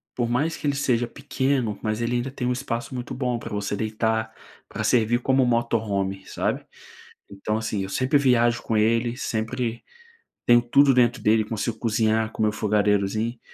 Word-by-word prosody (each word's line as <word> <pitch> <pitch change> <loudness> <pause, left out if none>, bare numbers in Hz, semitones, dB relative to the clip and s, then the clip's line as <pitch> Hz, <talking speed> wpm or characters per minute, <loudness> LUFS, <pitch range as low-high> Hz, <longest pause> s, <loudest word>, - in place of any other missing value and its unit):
por 120 -1 0
mais 145 +7 0
que - - -8
ele 140 - +1
seja 120 -4 +1
pequeno, 130 -5 -1
mas 110 +1 -1
ele 115 +1 0
ainda 125 +2 -3
tem 125 -2 -3
um 125 - +1
espaço 120 -1 -4
muito 125 0 -5
bom 125 -2 -1
para 115 - -8
você 100 0 -2
deitar, 110 +1 -1 0.4
para - - -4
servir 120 0 +2
como 130 0 +3
Motorhome, 105 -5 -1
sabe. - - -2 0.7
Então 105 +2 -3
assim, 110 -3 -2
eu - - -6
sempre 130 +6 +1
viajo 120 -3 +3
com 110 - -1
ele, 115 +2 +2
sempre 115 0 -3 0.6
tenho 120 0 +6
tudo 135 +3 +4
dentro 125 0 +3
dele, 110 +1 +4
consigo 110 +1 -3
cozinhar 110 -1 +1
com 110 - -2
meu 105 - +3
fogareirozinho, 105 +2 0
115 Hz, 175 wpm, -24 LUFS, 110-125 Hz, 0.7 s, tenho